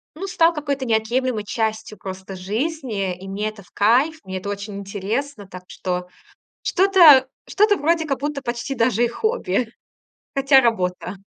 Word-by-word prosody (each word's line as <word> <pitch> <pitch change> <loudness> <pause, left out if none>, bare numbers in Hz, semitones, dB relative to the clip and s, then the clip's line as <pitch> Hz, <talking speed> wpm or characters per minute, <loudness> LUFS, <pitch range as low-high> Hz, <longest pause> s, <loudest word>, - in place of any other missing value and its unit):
ну, 380 +5 -5
стал 335 -2 +3
какой-то 280 -3 -3
неотъемлемой 230 0 0
частью 220 0 -3
просто 190 0 -8
жизни. 210 - -3
И 190 +2 -11
мне 205 +2 -2
это 215 -2 -13
в - - -25
кайф, 260 +10 +2
мне 190 0 -5
это 200 +2 -6
очень 205 0 -5
интересно, 205 +4 -4
так 180 -1 -10
что, 180 -1 -4 0.5
что-то 345 -9 +6 0.2
что-то 415 0 +3
вроде 325 +1 +1
как 275 -3 -1
будто 290 0 -3
почти 240 +1 -4
даже 235 -1 +2
и - - +3
хобби. 240 - -1 0.6
Хотя 275 0 +5
работа. 185 -5 -1
230 Hz, 155 wpm, -21 LUFS, 200-285 Hz, 0.6 s, что-то